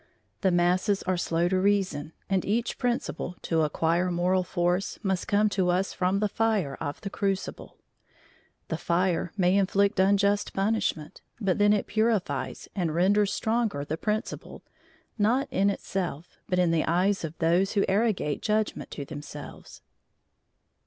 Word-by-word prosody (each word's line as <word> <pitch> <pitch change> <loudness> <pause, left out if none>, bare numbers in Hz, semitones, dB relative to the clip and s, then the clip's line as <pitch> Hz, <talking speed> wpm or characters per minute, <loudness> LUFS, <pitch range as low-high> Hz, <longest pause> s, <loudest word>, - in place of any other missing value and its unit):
The 190 - +3
masses 180 +3 +2
are 185 0 0
slow 170 -1 0
to 185 0 +1
reason, 185 -6 0
and 190 -2 +1
each 230 +4 -1
principle, 240 -7 -2
to 165 -1 +1
acquire 165 +3 +1
moral 180 +2 +1
force, 180 +1 -1
must 190 -2 -1
come 210 +1 +3
to 190 -3 0
us 185 +2 +1
from 185 +2 +1
the 210 +1 +1
fire 210 -9 0
of 145 -2 -4
the 195 - -5
crucible; 195 -2 -3 0.9
the 160 - -2
fire 175 -1 0
may 180 0 +3
inflict 200 +1 +2
unjust 200 +1 +2
punishment, 195 -6 -1 0.2
but 200 -3 0
then 205 0 +5
it 210 -1 +2
purifies 215 -2 -1
and 170 -5 -1
renders 200 +3 +3
stronger 220 -10 -1
the 155 - -2
principle, 215 +6 -4 0.6
not 245 +7 +2
in 200 -4 +2
itself, 180 -5 -4
but 180 - +1
in 180 -2 +3
the 165 -2 +1
eyes 185 +4 +1
of 160 0 -5
those 175 +4 +2
who 200 -2 +2
arrogate 195 -7 0
judgment 215 0 -1
to 140 - -6
themselves. 145 0 -10
190 Hz, 150 wpm, -27 LUFS, 175-205 Hz, 0.9 s, then